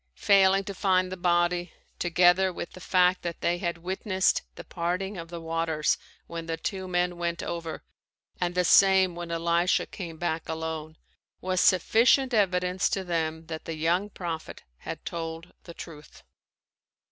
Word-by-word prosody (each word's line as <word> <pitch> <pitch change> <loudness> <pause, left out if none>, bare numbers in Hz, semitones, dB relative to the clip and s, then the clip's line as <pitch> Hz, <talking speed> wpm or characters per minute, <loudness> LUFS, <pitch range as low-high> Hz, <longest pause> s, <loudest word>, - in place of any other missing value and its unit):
Failing 195 -1 +5
to 200 0 -6
find 185 -1 +1
the - - -3
body, 175 -1 +1 0.3
together 180 +2 +4
with 170 - -6
the - - -12
fact 180 0 +3
that 170 -1 -5
they 175 +1 +1
had 170 -2 -2
witnessed 190 +2 0
the - - -9
parting 180 +3 -3
of 165 -2 -7
the 170 0 -6
waters 165 -2 0 0.3
when 165 -1 -7
the 165 0 -2
two 190 +1 -4
men 180 -1 0
went 170 -1 -2
over 165 -2 -5 0.6
and 175 0 -1
the 180 - +3
same 190 -1 +5
when 175 0 -7
Elisha 170 +1 +1
came 170 -5 -8
back 165 -1 -3
alone, 160 -1 -4 0.4
was 185 0 0
sufficient 240 +8 +4
evidence 180 -3 +2
to 195 - -1
them 160 -2 -2
that 160 -1 -7
the 165 - -4
young 175 +6 0
prophet 170 -5 -6 0.2
had - - -7
told 165 0 -6
the 170 - -9
truth. 150 -3 -11
175 Hz, 160 wpm, -27 LUFS, 165-185 Hz, 0.6 s, Failing